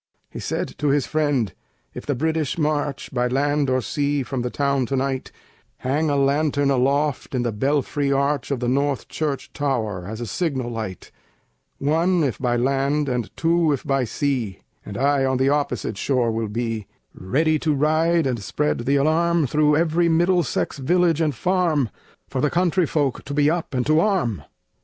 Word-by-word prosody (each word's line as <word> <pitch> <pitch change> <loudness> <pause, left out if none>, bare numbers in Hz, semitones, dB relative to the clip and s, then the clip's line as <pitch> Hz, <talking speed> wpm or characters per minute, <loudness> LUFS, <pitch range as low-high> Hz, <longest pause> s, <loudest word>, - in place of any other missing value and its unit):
He - - -7
said - - -2
to 150 - 0
his 140 -1 +2
friend: 145 - 0 0.4
"If - - -8
the 145 - 0
British 160 +2 -1
march 150 -3 -1
By 125 -1 +1
land 145 +2 +1
or 130 0 +2
sea 145 +5 0
from 130 0 -3
the 125 - -2
town 140 -1 0
tonight, 135 -1 -2 0.5
Hang 150 +5 0
a 145 - +1
lantern 140 0 +2
aloft 140 +2 +1
in 125 - 0
the 120 - 0
belfry 140 +4 0
arch 140 -1 0
Of 135 -3 -2
the 120 - 0
North 140 0 0
Church 150 -4 -3
tower, 110 -11 -2
as 110 +2 -6
a 120 - -3
signal 130 - -2
light, 110 -5 -6 0.7
One 165 +4 +2
if 135 -5 -1
by 125 -2 +1
land, 140 +4 +1
and 120 -4 -2
two 165 -1 +2
if 135 - -3
by 135 -3 +1
sea; 120 -6 -2 0.2
And 100 - -7
I 140 +1 +2
on 130 -1 +1
the 130 +1 +2
opposite 125 -8 -1
shore 125 -4 +1
will 110 -1 -2
be, 115 -2 -3 0.3
Ready 155 - +1
to 155 - 0
ride 155 +3 +2
and 125 -5 -1
spread 150 +8 -1
the 140 - +3
alarm 160 +3 +2
Through 150 +3 +3
every 170 +1 +2
Middlesex 170 -3 +1
village 170 +3 +2
and 150 -4 +1
farm, 170 - +1 0.4
For 130 - -3
the 150 - +2
country 175 0 +2
folk 140 -4 -1
to 140 - -5
be 145 +1 +4
up 165 -5 -3
and 125 -1 0
to 155 +1 +4
arm." 170 - 0
140 Hz, 180 wpm, -22 LUFS, 125-155 Hz, 0.7 s, be